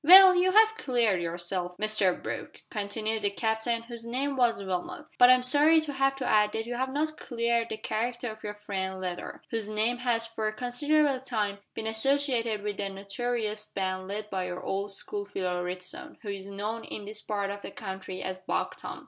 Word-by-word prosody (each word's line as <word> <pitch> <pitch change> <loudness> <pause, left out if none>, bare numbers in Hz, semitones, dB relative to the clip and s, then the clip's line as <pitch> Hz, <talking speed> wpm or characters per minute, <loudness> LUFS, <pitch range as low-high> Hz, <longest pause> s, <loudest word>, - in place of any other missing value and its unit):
"Well, 375 +4 +11
you 365 +1 +3
have 440 +1 +6
cleared 235 - +2
yourself, 175 +1 -3
Mr 215 -4 +2
Brooke," - - -6
continued 215 +1 -2
the 205 - +2
Captain, 220 +2 -1
whose 235 -1 -7
name 265 +4 -1
was 235 -5 +2
Wilmot, 180 -2 -3
"but 245 - +9
I'm 255 0 +6
sorry 295 +5 +5
to 300 -2 -5
have 270 0 +2
to 270 -2 -4
add 210 -2 +4
that 225 0 -2
you 240 - -4
have 260 +2 -1
not 310 +2 -1
cleared 235 -1 0
the 220 - -3
character 235 +2 -2
of 215 0 -12
your 210 0 -4
friend 190 -2 -3
Leather, 180 -1 -5
whose 225 -2 -2
name 220 +3 +1
has 235 -2 +1
for 225 -1 -3
a 215 - -1
considerable 275 +4 +2
time 215 -6 -2 0.2
been 220 - -4
associated 230 -2 +1
with 205 -1 -3
the 200 -1 -2
notorious 210 +2 -2
band 185 -1 -3
led 210 +1 -5
by 185 -1 -1
your 180 0 -5
old 200 +1 -2
school 205 +1 -2
fellow 185 -3 -2
Ritson, 180 0 -4
who 210 - -5
is 195 -1 -5
known 210 +3 -4
in 210 - -6
this 210 +1 -6
part 200 -2 -2
of 200 0 -6
the - - -6
country 190 -2 -6
as 185 0 -4
Buck 185 - -2
Tom. - - -7
215 Hz, 200 wpm, -29 LUFS, 200-245 Hz, 0.2 s, Well